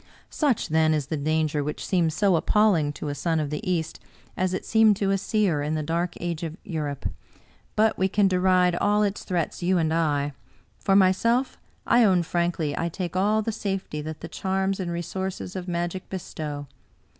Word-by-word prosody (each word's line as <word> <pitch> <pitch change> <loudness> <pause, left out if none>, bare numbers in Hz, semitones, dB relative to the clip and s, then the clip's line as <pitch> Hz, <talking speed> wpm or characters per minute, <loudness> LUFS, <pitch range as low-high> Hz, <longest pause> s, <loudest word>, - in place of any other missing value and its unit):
Such, 285 -8 0
then, 155 0 +3
is 150 -2 -1
the 155 - -3
danger 155 0 0
which 150 +1 -4
seems 170 -4 +1
so 195 0 +3
appalling 170 -4 +3
to 150 - -5
a - - -2
son 160 +2 0
of 150 -2 -2
the 150 - -3
East, 165 -3 -1 0.4
as 185 0 0
it 185 - -3
seemed 220 -2 +5
to 195 -1 +1
a 195 - +2
seer 200 -7 +1
in 150 +2 -1
the 155 - -1
dark 170 +3 -1
age 170 -2 -3
of 165 -1 -5
Europe. 150 -6 -3 0.7
But 220 +1 +2
we 190 - +3
can 200 +1 +3
deride 180 -1 +3
all 210 +1 +2
its 200 0 -1
threats, 175 -2 -2
you 180 +1 +2
and 160 -2 +1
I. 145 -3 0 0.5
For 195 - +2
myself, 215 +7 +3 0.3
I 240 0 +5
own 185 -5 +4
frankly 170 -3 -1
I 170 - -1
take 175 0 -5
all 210 +3 +2
the 225 - -1
safety 195 -7 -3
that 155 0 -7
the - - -6
charms 190 0 -1
and 180 -2 -2
resources 180 +2 -4
of 185 -1 -5
magic 175 +1 -3
be 190 - -3
stow. 150 -4 -6
175 Hz, 195 wpm, -25 LUFS, 155-195 Hz, 0.7 s, seemed